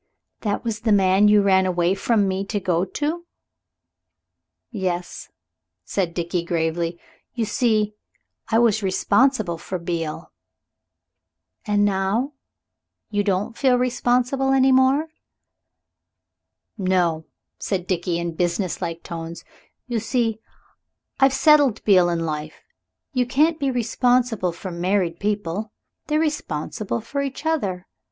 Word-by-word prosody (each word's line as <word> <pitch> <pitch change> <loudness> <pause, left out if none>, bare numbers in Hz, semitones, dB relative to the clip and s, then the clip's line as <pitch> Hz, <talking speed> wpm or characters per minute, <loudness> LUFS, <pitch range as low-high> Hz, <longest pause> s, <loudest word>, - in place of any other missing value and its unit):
"That 205 -2 -2
was 225 -3 -3
the 225 0 0
man 195 0 +4
you 210 -1 +5
ran 190 -1 +4
away 175 0 +1
from 205 +1 +1
me 190 +1 -1
to 205 +1 -2
go 180 -1 0
to?" 315 - -3 1.4
"Yes," 180 -5 -4 0.6
said 180 -4 -2
Dickie 170 0 -1
gravely; 170 0 -1 0.4
"you 230 -2 0
see, 215 -3 +1 0.6
I 225 - +3
was 225 -2 +3
responsible 200 -1 +2
for 185 - -4
Beale." 165 -2 -4 1.4
"And 205 0 +3
now? 205 +8 0 0.8
Don't 205 -1 +1
you - - -16
feel 255 +1 +3
responsible 250 +2 +1
any 265 0 +4
more?" 265 +4 +3 1.7
"No," 175 -4 +1 0.3
said 185 -3 -2
Dickie, 175 -2 -1
in 170 -1 -3
businesslike 170 -1 -2
tones; 165 0 -7 0.4
"you 240 -2 -2
see, 225 -1 -1 0.8
I've 270 0 +5
settled 275 -3 +4
Beale 185 -4 +5
in 165 -1 -1
life. 155 0 -5 0.5
You 250 -1 +1
can't 310 +6 +2
be 280 -2 0
responsible 245 -4 +1
for 180 +2 -7
married 175 0 0
people. 205 0 -2 0.4
They're 305 0 +1
responsible 230 - -2
for 280 +6 -3
each 275 +2 -5
other. 200 - -1
205 Hz, 120 wpm, -22 LUFS, 175-245 Hz, 1.7 s, you